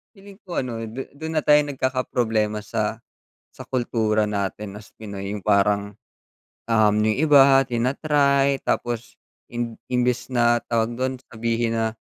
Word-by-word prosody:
Feeling 200 0 -15
ko 175 - -2
ano, 120 -3 -5
du 125 +5 -6
dun 160 +2 -6
na 155 - +1
tayo 150 0 +6
nagkakaproblema 120 -6 -1
sa 110 +2 -3 0.5
sa - - -9
kultura 110 -4 0
natin 100 0 -4
na 105 - -11
as - - -22
Pinoy, 100 -2 -6
yung 105 - -5
parang, 100 +1 +1 0.7
um, 105 -2 +4
yung 110 0 +1
iba 135 -2 +7
tina-try, 140 +3 +2
tapos 120 -1 -3 0.3
imb 120 -1 -3 0.2
imbes 125 +1 0
na 120 -1 +2
tawag 115 0 -1
dun, 130 0 -2
sabihin 115 0 -1
na 110 0 0
120 Hz, 145 wpm, -23 LUFS, 110-130 Hz, 0.7 s, iba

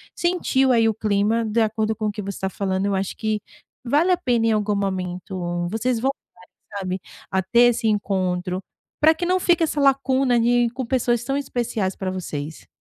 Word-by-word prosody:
sentiu 310 -7 +1
aí, 230 -2 +4
o 220 - +2
clima, 215 +1 +1
de 220 +2 +1
acordo 220 0 0
com 215 - -4
o - - 0
que 210 - -6
você 200 - -6
está 190 - -2
falando. 190 0 -2
Eu 200 -1 +1
acho 190 0 -3
que 215 -2 -1 0.4
vale 300 +9 +2
a 360 - +4
pena 235 -5 +1
em - - +3
algum 210 -1 +1
momento, 180 -2 -3
vocês 225 +2 -1
voltarem 270 +3 -1 0.6
sabe, 185 -1 -3 0.3
a 190 - +2
ter 225 +6 +3
esse 225 -1 -1
encontro 185 -3 0 0.4
para 315 +2 +6
que 350 - -3
não 365 +1 +2
fique 345 -2 +3
essa 300 -2 0
lacuna 265 -2 +3
de 240 0 +3
com 260 -1 -4
pessoas 240 -2 +1
tão 270 +3 -2
especiais 240 -8 -2
para 190 -1 -3
vocês. 155 -4 -6
220 Hz, 190 wpm, -22 LUFS, 190-255 Hz, 0.6 s, para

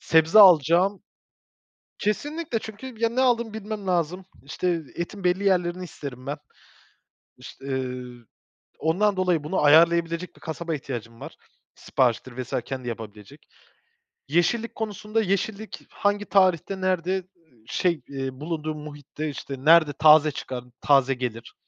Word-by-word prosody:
Sebze 160 +4 +4
alacağım 180 +1 +6 1.0
Kesinlikle 290 - -2
çünkü 220 +4 -9
ya, 230 - +2
ne 235 +3 -1
aldığımı 235 -4 +1
bilmem 215 -2 -6
lazım, 180 +1 -1 0.2
işte 165 +4 -2
etin 180 +3 -5
belli 180 +3 +1
yerlerini 180 -2 +1
isterim 135 -6 -9
ben. 145 +2 -3 1.0
İş - - -12
ııı, 125 -3 -5 0.5
ondan 195 +5 +1
dolayı 180 -5 +1
bunu 155 +1 -1
ayarlayabilecek 170 +3 +4
bir - - -19
kasaba 165 0 -4
ihtiyacım 115 -5 -7
var. - - -9 0.4
Sipariştir 125 0 0
vs. 125 - -8
kendi 130 -2 -6
yapabilecek. 105 -3 -9 0.8
Yeşillik 175 - 0
konusunda 215 0 -2
yeşillik 205 +2 -3
hangi 205 0 -1
tarihte 190 -1 +2
nerede, 185 0 0 0.4
şey, 170 +6 0
eee, 135 -1 -4
bulunduğu 155 0 -4
muhitte, 150 0 -7
işte, 140 -1 -6
nerede 160 -2 +6
taze 155 +1 +6
çıkar, 130 -3 -6 0.2
taze 135 -2 +4
gelir, 120 -3 -5
170 Hz, 125 wpm, -25 LUFS, 140-195 Hz, 1.0 s, alacağım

